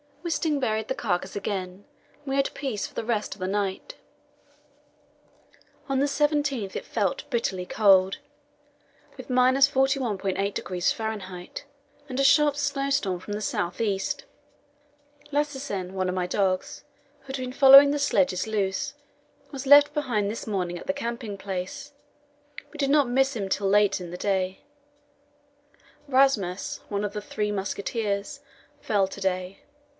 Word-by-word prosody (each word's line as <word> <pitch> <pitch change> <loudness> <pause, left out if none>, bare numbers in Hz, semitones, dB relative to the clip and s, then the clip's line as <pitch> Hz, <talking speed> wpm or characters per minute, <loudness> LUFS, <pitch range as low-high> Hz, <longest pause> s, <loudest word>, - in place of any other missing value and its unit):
Wisting 315 -3 0
buried 220 -4 -1
the 265 - -2
carcass 190 -6 -2
again, 195 -1 -4 0.3
and 290 - -31
we 270 -1 -2
had 275 0 +1
peace 255 -8 -3
for - - -18
the - - -3
rest 220 -2 -1
of - - -21
the 185 - -2
night. 200 - -3 1.9
On 270 - +1
the 280 - +3
17th 285 -7 0
it - - -4
felt - - -2
bitterly 205 -8 -1
cold, 195 -2 +4 1.0
with - - -9
41.8° 250 -8 +1
F., - - -7 1.1
and 260 -1 -4
a - - +3
sharp 285 +1 +5
snowstorm 275 -9 -1
from 205 +3 -7
the 210 - -3
south 175 -3 -2
east. 205 - -1 1.1
Lassesen, 270 -11 -2
one 190 -1 -1
of 180 - -2
my 180 -1 0
dogs, 185 -1 -1 0.4
who - - -28
had 265 0 -4
been 255 -1 -5
following 275 +1 +9
the 290 - -1
sledges 270 -9 +1
loose, 200 -3 -1 0.6
was 275 -1 -6
left 290 +1 +7
behind 230 -9 -1
this 225 - -7
morning 180 -4 -2
at - - -12
the 190 - +1
camping 230 -3 -5
place; 190 +8 -5 0.8
we 305 - -11
did 280 -2 0
not 285 -3 +4
miss 270 +2 +2
him 200 -4 -3
till 195 +1 0
late 205 0 +3
in 175 - -7
the 180 - -6
day. 190 -1 -1 1.5
Rasmus, 255 -9 +1
one 205 0 -2
of 205 -1 -3
the 210 - -4
"Three 210 0 -3
Musketeers," 205 +4 -3 0.4
fell 200 -6 +1
to 195 - -10
day. 185 0 -2
215 Hz, 145 wpm, -26 LUFS, 195-275 Hz, 1.9 s, following